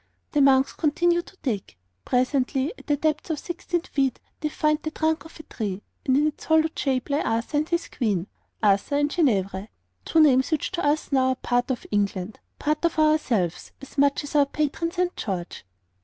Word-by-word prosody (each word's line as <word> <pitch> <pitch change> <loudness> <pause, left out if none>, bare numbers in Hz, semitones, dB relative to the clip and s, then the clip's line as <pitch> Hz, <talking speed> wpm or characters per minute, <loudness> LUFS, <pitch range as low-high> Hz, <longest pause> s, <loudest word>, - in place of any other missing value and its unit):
The 295 - +2
monks 270 -1 +4
continue 345 +3 +2
to 375 - -18
dig. 210 - -3 0.3
Presently, 260 - +1
at - - -16
the 295 -1 +2
depth 305 +2 -1
of 320 - -1
16 345 +2 -3
feet, 270 -6 -1 0.2
they 305 - -1
find 305 0 +1
the 310 - -3
trunk 315 +1 -1
of 320 - -13
a - - -8
tree, 205 -7 -4 0.2
and 260 0 +4
in 295 - +3
its 305 - -3
hollowed 320 0 +2
shape 265 -1 -1
lie 285 - +2
Arthur 230 +6 -1
and 305 +2 0
his 340 0 0
Queen 205 -9 -1 0.4
Arthur 200 +7 +3
and 290 0 +1
Guinevere, 200 - +1 0.4
two 325 - +2
names 265 -4 +5
which 315 -3 -1
to 360 -1 -2
us 295 +1 +1
now 260 -1 +3
are 260 - +2
part 245 0 0
of 255 -3 -2
England, 200 -1 -1 0.2
part 305 +1 -1
of 335 - +1
ourselves, 270 - +1
as 275 - -13
much 280 +1 +3
as 290 - -7
our 285 -1 +5
patron 305 +3 -1
St. 360 0 -1
George. 180 - -5
285 Hz, 195 wpm, -25 LUFS, 245-315 Hz, 0.4 s, names